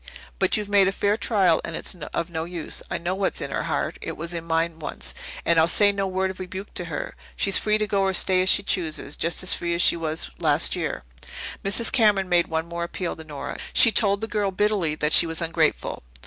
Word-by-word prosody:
But - - +2
you've 210 -1 -4
made 200 -2 +4
a - - +2
fair 205 +1 0
trial 195 -7 +2
and 165 - -5
it's - - 0
of 170 0 -5
no 160 -1 -3
use. 170 -1 -5
I - - -2
know 175 +2 -3
what's 195 0 -1
in - - -4
her - - -2
heart - - -2
it - - -6
was 170 +2 -5
in 170 -1 -4
mine 165 0 -1
once 155 - -5 0.3
and 170 -1 +4
I'll 160 - +4
say 205 +3 +5
no 195 -1 -2
word 190 0 -1
of 190 - -13
rebuke 185 +2 -7
to - - -3
her. - - -5 0.2
She's 195 -1 +3
free 215 0 +1
to 215 - -1
go 200 -1 0
or 190 0 +1
stay 185 +1 +4
as 185 - +3
she 200 - +5
chooses 160 -6 -1
just 170 +3 0
as 185 - +3
free 170 0 -2
as 170 - 0
she - - +5
was 160 - -4
last - - +2
year." - - -4 0.6
Mrs. 210 +4 +1
Cameron 210 -6 +3
made 175 -1 +3
one 160 0 -2
more 170 0 -5
appeal 170 +1 -4
to 160 - -10
Nora. 150 -3 -7
She 230 - +7
told 200 -2 +3
the 225 - -2
girl 205 -3 -1
bitterly 190 -5 0
that 150 0 -1
she 170 - +7
was 165 -1 -4
ungrateful. 165 -1 -1
180 Hz, 240 wpm, -24 LUFS, 165-200 Hz, 0.6 s, She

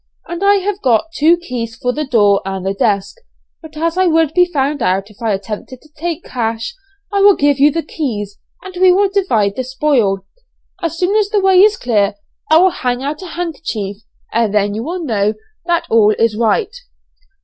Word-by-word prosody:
I 395 +4 +2
have 410 -1 -2
got 255 +5 +1
two 325 +4 +4
keys 240 -9 -5
for 250 +2 -2
the 300 +1 -3
door 205 -6 +3
and 190 -1 -5
the 195 - 0
desk, 200 - -1 0.4
but 315 -1 -12
as 335 +3 -1
I 375 - +3
would 325 -2 +2
be 360 +1 +5
found 285 -3 -1
out 195 +1 0
if 210 - -20
I 225 -2 0
attempted 210 +5 -5
to 305 - -21
take 335 +1 -4
the - - -16
cash, 225 - -3 0.4
I 400 - +2
will 400 -1 +6
give 285 -1 +1
you 290 +2 +6
the 330 +2 -2
keys, 210 -11 -5 0.2
and 375 -1 -10
we 370 -1 +7
will 390 +2 +2
divide 225 - +1
the 255 - -2
spoil. 250 -8 0 0.6
As 335 -1 -3
soon 370 +4 0
as 425 -2 +2
the 420 -1 +1
way 380 -1 +4
is 420 +2 +5
clear 210 -4 0 0.3
I 315 - +6
will 370 +2 +5
hang 250 -2 -2
out 295 +4 -4
a 370 - -7
handkerchief 310 - -4 0.4
and 230 -2 +1
then 205 -1 +1
you 215 - -3
will 345 +5 -4
know 215 -6 0 0.3
that 340 -1 +1
all 215 -2 +4
is 225 -2 +1
right.' 310 - 0
275 Hz, 205 wpm, -16 LUFS, 215-345 Hz, 0.6 s, we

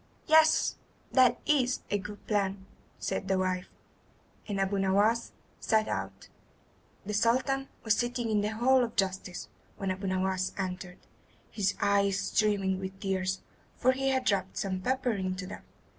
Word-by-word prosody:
"Yes, 315 0 +5 0.3
that 255 -2 +5
is 260 -4 +2
a 205 - +2
good 205 +2 -9
plan," 195 -2 -1 0.3
said 195 - -3
the 190 -1 +2
wife; 185 -1 -1 0.8
and 200 -2 -2
Abu 195 +1 +1
Nowas 205 +4 +2 0.3
set 220 -1 +2
out. - - -4 0.8
The 210 - -3
Sultan 260 +5 +2 0.2
was 220 -1 +3
sitting 240 -1 -1
in 210 -1 +2
the 205 - 0
hall 245 +4 +3
of 235 - -4
justice 190 -2 -2 0.3
when 195 -1 -2
Abu 190 +1 -4
Nowas 185 0 0
entered, 185 -1 -4 0.5
his 200 -3 0
eyes 200 -1 +3
streaming 200 -2 +1
with 190 0 -6
tears, 190 -1 -1 0.4
for 255 - +4
he 270 +1 0
had 260 -4 +2
rubbed 190 -1 -2
some 190 -2 -2
pepper 260 +3 0
into 185 -2 -3
them. - - -8
200 Hz, 150 wpm, -30 LUFS, 190-235 Hz, 0.8 s, Yes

